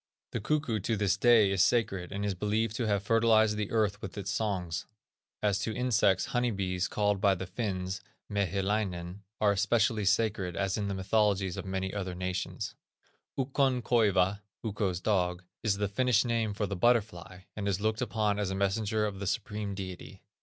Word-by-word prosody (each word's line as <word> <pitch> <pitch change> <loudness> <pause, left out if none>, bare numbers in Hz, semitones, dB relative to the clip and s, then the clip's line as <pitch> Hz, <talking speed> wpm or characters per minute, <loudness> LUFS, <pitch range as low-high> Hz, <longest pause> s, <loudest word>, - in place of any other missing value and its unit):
The - - -2
cuckoo 145 -3 0
to 110 +3 -1
this 100 -2 +2
day 110 -1 +5
is 95 -2 +4
sacred, 95 -7 +1
and 100 +1 -3
is 100 - 0
believed 105 +3 -1
to 120 - -1
have 100 -2 +1
fertilized 110 -1 +4
the 105 -1 -2
earth 105 -2 0
with 95 - -7
his 100 -1 -4
songs. 95 -6 -2 0.6
As 105 -1 +2
to 110 +2 -2
insects, 110 -7 +2
honey 125 0 +2
bees, 95 -4 -1
called 105 -2 0
by 100 -2 +4
the 95 - -5
Finns, 95 -2 -3 0.3
Mehilainen, 100 -2 -1 0.2
are 105 -1 +4
especially 110 +1 +2
sacred, 100 -3 +1
as 95 +1 0
in 105 -2 -2
the 100 - -2
mythologies 95 -1 +1
of - - -5
many 95 0 -3
other 95 -3 -3
nations. 90 +1 -3 0.6
Ukkon 135 -2 +1
koiva 100 -5 +3 0.2
(Ukko's 100 -5 -1
dog) 90 -4 0 0.2
is 105 -3 +1
the 105 0 0
Finnish 125 +2 +2
name 115 -3 0
for 105 - -1
the 100 - -3
butterfly, 95 -4 +1
and 100 -1 -3
is 100 -1 0
looked 110 +1 0
upon 105 0 0
as 100 -2 0
a 95 - -2
messenger 105 +2 0
of 100 -2 -4
the 100 - -4
Supreme 105 -1 -2
Deity. 95 0 -8
100 Hz, 180 wpm, -30 LUFS, 95-110 Hz, 0.6 s, day